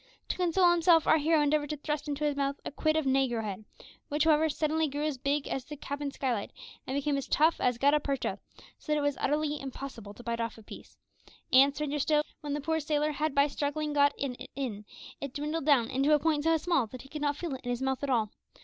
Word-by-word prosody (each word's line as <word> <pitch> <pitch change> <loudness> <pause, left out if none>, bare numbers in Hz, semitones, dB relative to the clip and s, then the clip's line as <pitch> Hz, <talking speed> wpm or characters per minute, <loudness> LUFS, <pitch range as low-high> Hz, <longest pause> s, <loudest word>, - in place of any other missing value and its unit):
To - - 0
console 360 0 +4
himself 335 -1 +4
our 315 - +5
hero 315 +2 +3
endeavoured 295 0 +1
to 300 - -3
thrust 300 +1 -3
into 295 0 -3
his 295 -1 +1
mouth 280 0 -1
a - - -4
quid 310 +2 +1
of 315 - 0
negro 260 -4 +1
head, 210 0 -5 0.4
which, 295 +1 +1
however, 315 0 +4
suddenly 310 +1 0
grew 290 +1 -3
as 295 -4 -2
big 280 +2 0
as 270 - -3
the 295 +1 -8
cabin 285 +1 -4
skylight, 250 -6 -2 0.4
and 265 - -2
became 285 0 0
as 275 - -4
tough 315 +3 +3
as 250 -2 +2
gutta 285 +4 +4
percha, 280 -3 -2 0.4
so 305 - -6
that 300 - +3
it - - 0
was 285 -1 +1
utterly 295 +1 0
impossible 255 -6 -8
to 245 - -12
bite 235 0 -2
off 230 -1 -3
a 220 - -13
piece; - - -12 0.6
and, 275 +2 +6
stranger 295 0 -2
still, 300 +1 +2 0.2
when 290 -2 -3
the 295 - -3
poor 320 +2 0
sailor 300 0 0
had 300 0 -2
by 280 0 +5
struggling 295 +1 -2
got 285 0 +4
it 260 -3 -5
in, 220 -7 -4 0.4
it 280 -2 -6
dwindled 300 +1 -2
down 260 -6 +5
into 275 +3 +3
a - - +2
point 305 -1 0
so 325 0 +4
small 320 -6 +1
that 250 +3 -10
he - - -14
could 300 0 -6
not 290 -1 0
feel 335 -3 -4
it 260 - -6
in 245 - -5
his 245 +1 -2
mouth 265 -1 -1
at 285 - -2
all. 225 -5 +1
290 Hz, 245 wpm, -30 LUFS, 270-305 Hz, 0.6 s, and